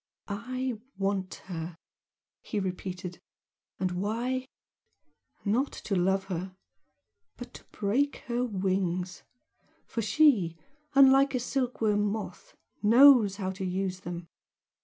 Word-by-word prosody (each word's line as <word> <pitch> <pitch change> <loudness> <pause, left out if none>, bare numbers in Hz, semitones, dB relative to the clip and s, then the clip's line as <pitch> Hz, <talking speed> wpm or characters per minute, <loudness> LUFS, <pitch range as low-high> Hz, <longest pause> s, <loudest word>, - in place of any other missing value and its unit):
"I 250 +3 -3 0.2
want 195 -1 -1
her!" 170 -2 -5 0.7
he 210 - -3
repeated 180 -1 -5 0.6
"And 185 0 0
why? 235 +8 -2 1.0
Not 240 +8 +1
to 205 - -4
'love' 190 +2 +2
her, 185 0 -5 0.8
but 245 0 -9
to - - -11
break 255 +8 -1
her 240 0 -1
wings, 185 -4 -1 0.6
for 230 - -3
she, 210 - +3 0.4
unlike 275 0 +6
a - - +1
silkworm 240 -5 0
moth, 215 - -4 0.3
knows 230 -2 +7
how 190 -2 -3
to 190 +1 -6
use 185 0 -2
them! 175 -2 -7
200 Hz, 110 wpm, -29 LUFS, 185-245 Hz, 1.0 s, knows